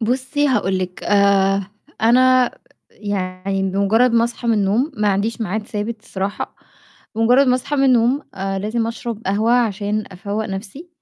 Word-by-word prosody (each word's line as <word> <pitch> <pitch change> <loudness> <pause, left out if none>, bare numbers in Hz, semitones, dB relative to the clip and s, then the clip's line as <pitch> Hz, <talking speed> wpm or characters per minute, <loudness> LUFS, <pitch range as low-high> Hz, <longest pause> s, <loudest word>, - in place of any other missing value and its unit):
بُصّي 260 +5 0
هاقول 195 -6 +1
لِك، 180 -1 -5
آآ 200 -1 +3 0.4
أنا 255 +2 +4 0.4
يعني 195 -1 -3
بمُجرّد 210 +6 +3
ما 230 0 +4
أصحى 235 0 -4
من 230 - +4
النوم 215 +9 +1
ما 210 -1 +1
عنديش 210 +4 -1
ميعاد 210 +1 -3
ثابت 215 +1 -4
الصراحة، 195 0 -4 0.6
بمُجرّد 245 +5 +4
ما 250 - +4
أصحى 285 +3 -2
من 275 - +3
النوم 255 +2 +3
آآ 195 0 -3
لازم 225 +3 -1
أشرب 230 -1 -5
قهوة 215 +4 +1
عشان 215 -3 0
أفوَّق 205 +4 -4
نَفْسي 210 - -7
215 Hz, 150 wpm, -19 LUFS, 195-240 Hz, 0.6 s, أنا